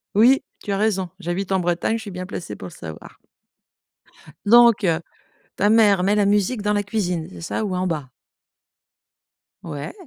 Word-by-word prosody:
Oui, 250 +6 +5 0.2
tu 205 - -5
as 195 - 0
raison. 195 -4 0
J'habite 185 +2 -3
en 190 - +2
Bretagne, 175 +5 0
je 225 - -7
suis 205 - -8
bien 180 0 -6
placée 140 - -7
pour 95 - -8
le - - -12
savoir. 80 -1 -10 1.3
Donc 235 -1 +6 0.7
ta 205 - +3
mère 210 -4 +5
met 205 +2 +2
la 205 - +3
musique 205 +3 +1
dans 210 0 0
la 205 - 0
cuisine, 180 -6 -2
c'est - - -10
ça 180 +5 -3
ou 185 - -2
en 185 0 -1
bas? 150 -6 -3 1.5
Ouais. 145 -3 -6
195 Hz, 175 wpm, -22 LUFS, 175-210 Hz, 1.5 s, Donc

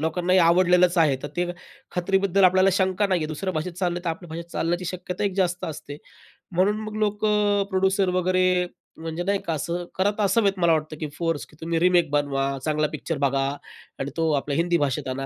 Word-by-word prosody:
लोकांना 175 +3 0
हे 185 - +6
आवडलेलच 180 +1 +4
आहे 150 -5 +4
तर 145 - -4
ते 175 0 +1 0.5
खात्रीबद्दल 195 +2 +2
आपल्याला 185 +1 +5
शंका 190 +2 +1
नाही 185 -3 +1
आहे. 155 - -1
दुसऱ्या 185 +5 -3
भाषेत 160 +3 -3
चाललं 175 0 -2
तर - - -1
आपल्या 170 +1 -7
भाषेत 165 +1 -5
चालण्याची 175 +2 -1
शक्यता 180 +2 -4
एक 195 -2 -1
जास्त 180 -2 0
असते. 150 -2 -7 0.6
म्हणून 190 +4 +2
मग 215 0 -6
लोक 210 0 0
अ, 205 -1 +2
प्रोड्युसर 190 0 +2
वगैरे 185 0 +2 0.3
म्हणजे 165 +1 -4
नाही 200 +2 0
का, 165 - -1
असं 170 +4 -3
करत 205 +3 0
असावेत 200 -1 +3
मला 170 -1 +4
वाटतं, 155 0 -2
की 155 - -3
फोर्स, 165 -3 -1
की - - -20
तुम्ही 165 0 -1
रिमेक 175 -2 +3
बनवा, 140 -2 0 0.2
चांगला 155 0 +1
पिक्चर 155 +2 -3
बघा 135 0 +1 0.5
आणि 135 - -3
तो 160 -1 +1
आपल्या 140 0 -1
हिंदी 170 +1 +2
भाषेत 140 -5 -1
आणा, 135 +1 -3
175 Hz, 200 wpm, -24 LUFS, 160-190 Hz, 0.6 s, हे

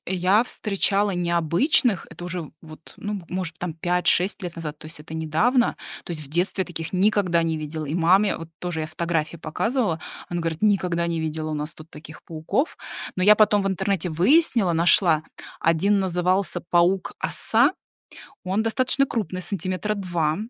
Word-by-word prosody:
я 190 +5 +2
встречала 205 -2 0
необычных, 175 - +1
это 165 +2 -10
уже 175 -3 -5
вот, 155 0 -14
ну, 205 -1 -4
может 180 -3 -4
быть, - - -34
там 175 -2 -4
5-6 180 +4 +1
лет 175 -1 -5
назад, 155 -2 -6
то 155 - -11
есть 155 -1 -11
это 155 - -12
недавно, 165 - +1 0.3
то - - -6
есть 155 -2 -5
в 140 - -9
детстве 180 +5 0
я - - -8
таких 165 -2 -5
никогда 185 -3 +2
не 165 -1 -1
видела. 155 +1 -5
И 150 +1 -4
маме, 185 +4 +3
вот 165 - -8
тоже 175 -3 -3
я - - -3
фотографии 165 0 -2
показывала, 205 - -1 0.3
она 175 0 -3
говорит: 165 +1 -3
"Никогда 180 -5 +2
не 165 -1 -2
видела 155 0 -3
у - - -2
нас 150 +2 -4
тут 155 +1 -14
таких 155 +1 -12
пауков". 165 - -2 0.4
Но 185 - +1
я 210 +2 +8
потом 210 -1 +4
в - - -2
интернете 190 -2 -1
выяснила, 200 - +3
нашла, 165 -1 +4 0.4
1 180 +6 +2
назывался 185 0 0
паук-оса. 195 - +3 0.7
Он 190 +4 0
достаточно 255 +4 +2
крупный, 185 -7 -3
сантиметра 190 +2 -2
2, 175 -6 -1
175 Hz, 170 wpm, -23 LUFS, 160-200 Hz, 0.7 s, я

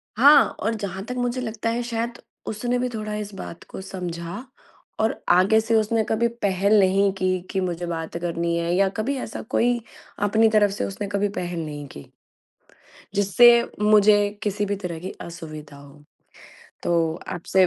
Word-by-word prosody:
हाँ 285 +5 +8 0.2
और 225 +1 0
जहाँ 195 -2 -5
तक 250 - -5
मुझे 245 +1 -1
लगता 225 -1 -3
है 235 +1 -1
शायद 235 0 -3 0.3
उसने 240 +3 -1
भी 250 0 -1
थोड़ा 215 -2 -5
इस 210 -1 -5
बात 170 - -8
को - - -7
समझा 175 +2 -6 0.6
और 220 +1 +1
आगे 195 +5 +5
से 225 +1 0
उसने 220 +1 +2
कभी 230 +2 +2
पहल 200 -2 +1
नहीं 195 +1 +3
की, 185 -1 0
कि 190 +1 -4
मुझे 175 -1 -2
बात 165 0 -4
करनी 170 0 -1
है 170 +1 -1
या 195 0 +4
कभी 265 +6 -1
ऐसा 225 - -5
कोई 240 0 +2 0.5
अपनी 220 +2 +4
तरफ 210 -2 +3
से 200 - -2
उसने 200 +1 -5
कभी 200 0 0
पहल 175 -3 -4
नहीं 145 -1 -6
की। 70 - -11 1.1
जिससे 205 +4 +6 0.3
मुझे 210 -1 +5
किसी 205 0 -1
भी 200 0 -1
तरह 180 -4 -5
की 190 +2 -6
असुविधा 155 -4 -9
हो, 145 +1 -15 0.8
तो 165 -2 +1
आपसे 185 +1 +2
200 Hz, 170 wpm, -23 LUFS, 175-220 Hz, 1.1 s, हाँ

